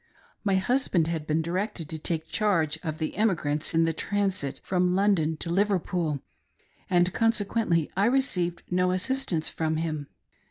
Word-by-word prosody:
My 200 -3 +2
husband 190 -4 +2
had 160 -2 -3
been 155 +1 +1
directed 180 0 -2
to 160 - -5
take 160 0 -2
charge 165 -8 +1
of 155 -2 -4
the 155 -1 -3
emigrants 155 -8 0
in 165 - +5
the 165 0 +1
transit 195 -5 -1
from 180 -1 +1
London 185 -6 +2
to 170 - -4
Liver 200 +2 +3
pool, 165 -5 -2 0.7
and 175 0 +3
consequently 215 -7 +1
I 195 +2 +3
received 205 -9 +1
no 180 0 +2
assistance 185 -2 0
from 160 -1 -1
him. 155 -3 -3
175 Hz, 155 wpm, -27 LUFS, 160-200 Hz, 0.7 s, in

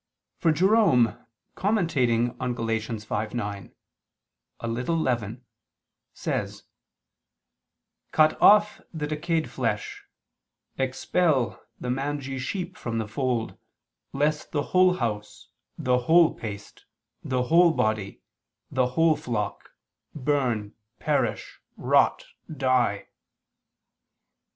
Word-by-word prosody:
For 165 - +3
Jerome 175 - +4 0.4
commenting 135 - +1
on 125 -1 -2
Gal. 115 - -3
5:9, 110 -2 -3 0.9
"A 115 - -3
little 125 +8 -1
leaven," 120 -4 -2 0.7
says: - - -4 1.5
"Cut 155 0 +4
off 210 0 +6
the 155 -3 -4
decayed 155 +2 -1
flesh, - - -3 0.8
expel 135 0 0 0.2
the 125 - -3
mangy 135 0 -3
sheep 180 +7 -4
from 115 -1 -4
the 110 -1 -2
fold, 120 -1 -2 0.5
lest 150 +2 -1
the 145 -2 0
whole 185 0 +5
house, 105 -3 -4 0.3
the 125 -5 +1
whole 165 +6 +5
paste, 105 -2 -9 0.4
the 130 -1 0
whole 170 +5 +5
body, 110 - -1 0.5
the 130 -1 +2
whole 165 -1 +5
flock, 115 -8 -4 0.5
burn, 125 -7 -1 0.3
perish, - - -1 0.2
rot, - - +2 0.3
die. 130 -7 +1
130 Hz, 95 wpm, -26 LUFS, 115-160 Hz, 1.5 s, off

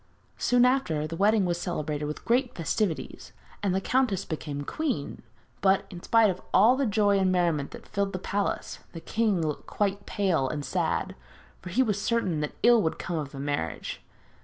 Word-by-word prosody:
Soon 245 0 +4
after, 215 - +1
the 160 +2 -5
wedding 205 +2 +3
was 175 -1 -1
celebrated 150 -4 -2
with 150 +1 -6
great 250 +1 +1
festivities, 170 +1 -2 0.3
and 195 -3 +1
the - - +2
countess 220 -3 +1
became 150 -3 -4
queen; 255 - -3 0.4
but, 195 0 +3
in 175 -2 -8
spite 225 -1 +4
of 185 - -8
all 220 +7 +6
the 270 -1 0
joy 205 -1 +3
and 190 -1 +2
merriment 170 -6 +1
that - - -11
filled 200 -1 -1
the 185 - -3
palace, 200 +2 -2
the 165 - -6
king 210 0 0
looked 200 +6 -2
pale 175 -10 +1
and 145 0 -4
sad, - - -1 0.5
for - - -8
he 250 +9 +3
was 210 -4 -1
certain 200 -10 0
that 150 -1 -3
ill 240 -1 +6
would 160 - -1
come 170 -3 -3
of 145 -3 -5
the 135 - -8
marriage. 140 - -3
190 Hz, 185 wpm, -27 LUFS, 155-215 Hz, 0.5 s, all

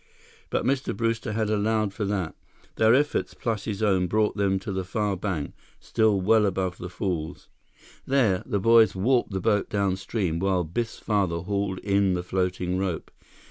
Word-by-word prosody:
But - - -1
Mr. 130 -6 0
Brewster 115 -1 -1
had 110 -1 0
allowed 110 -1 +1
for 105 +1 -3
that. 95 -5 -2 0.4
Their 110 +2 +5
efforts, 145 +2 0
plus 110 -4 -3
his 105 -1 -3
own, 95 -3 +2
brought 105 +3 +1
them 100 -2 +1
to 95 +2 -5
the 95 -1 -2
far 105 +2 -1
bank, 90 -6 -3 0.3
still 110 -3 +2
well 105 +2 +4
above 95 -1 -2
the 90 - -6
falls. 90 -4 -4 0.6
There, 120 -9 +2
the 100 - 0
boys 115 -1 +5
warped 120 +6 +2
the 95 -2 -3
boat 105 +2 +1
downstream 95 -3 -1
while 95 -1 +1
Biff's 110 +8 -3
father 95 -6 0
hauled 100 0 -2
in 100 -1 +2
the 90 - -3
floating 90 0 -1
rope. 95 -4 -3
100 Hz, 170 wpm, -26 LUFS, 95-110 Hz, 0.6 s, Their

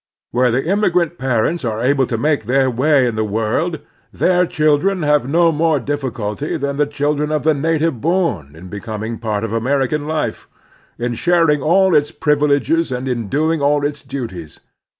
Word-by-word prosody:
Where 125 +1 +2
the 125 +3 0
inmiigrant 175 -2 +1
parents 135 +6 0
are 110 -2 -2
able 135 0 +2
to 115 - -2
make 145 -1 0
their 130 +2 +2
way 135 +2 +3
in 120 - -1
the 110 - 0
world, 115 - -1 0.3
their 180 -1 +2
children 160 +3 +1
have 150 -3 +2
no 165 +2 +4
more 160 -1 +1
difficulty 130 -1 -3
than 140 -1 -3
the 150 -1 +2
children 145 +1 -1
of 155 -1 -1
the 155 +1 +3
native 160 -3 0
bom 160 - -1
in 85 +3 -11
becoming 110 +3 -6
part 110 -2 -2
of 115 -1 -3
American 135 +5 0
life, 155 -1 -3 0.5
in 120 +1 -2
sharing 165 +2 +2
all 190 +4 +3
its 150 -1 +3
privileges 150 +1 +1
and 125 +1 -3
in 120 -5 -3
doing 155 +4 0
all 145 0 +2
its 145 0 -3
duties. 115 - -7
145 Hz, 170 wpm, -18 LUFS, 120-155 Hz, 0.5 s, no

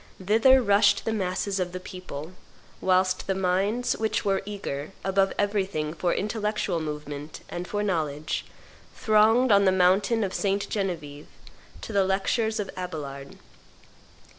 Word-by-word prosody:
Thither 225 +7 +5
rushed 200 -1 +4
the 225 - 0
masses 195 0 -1
of 180 -1 -2
the 185 - -4
people, 180 -4 -8 0.5
whilst 185 0 +2
the 195 - 0
minds 195 +6 0
which 220 0 -1
were 195 -1 +1
eager, 195 -6 -5
above 195 0 +2
everything, 190 -7 -1
for 175 +1 -1
intellectual 210 -3 -1
movement 150 -1 -6
and 175 +1 -5
for 205 0 -2
knowledge, 155 -6 -2 0.5
thronged, 220 +3 +4
on 200 0 +5
the 190 - +5
mountain 190 +5 +3
of 190 -2 -2
St. 200 0 0
Genevieve, 160 -8 -4 0.5
to 225 - -7
the 200 -1 +4
lectures 215 +4 0
of 200 - -3
Abelard. 145 -7 -6
190 Hz, 140 wpm, -26 LUFS, 175-210 Hz, 0.5 s, Thither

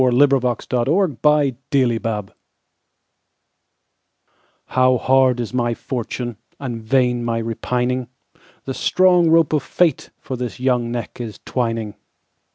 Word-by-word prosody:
The 130 - +4
Convict 125 -1 +2
of 120 -1 +2 0.4
Clonmala 130 -7 +1 2.3
HOW 130 0 +3
hard 130 0 +3
is 120 0 -4
my 120 -2 0
fortune, 120 -2 -5 0.2
And 120 -5 -5
vain 125 +1 +1
my 115 -1 -1
repining! 125 +2 -2 0.6
The 135 - -3
strong 180 +2 +3
rope 165 -2 +4
of 150 - +2
fateFor 155 -6 -1
this 125 -1 -5
young 125 -2 0
neck 120 +1 -5
is 110 -3 -7
twining. 115 -4 -2
125 Hz, 110 wpm, -20 LUFS, 120-135 Hz, 2.3 s, The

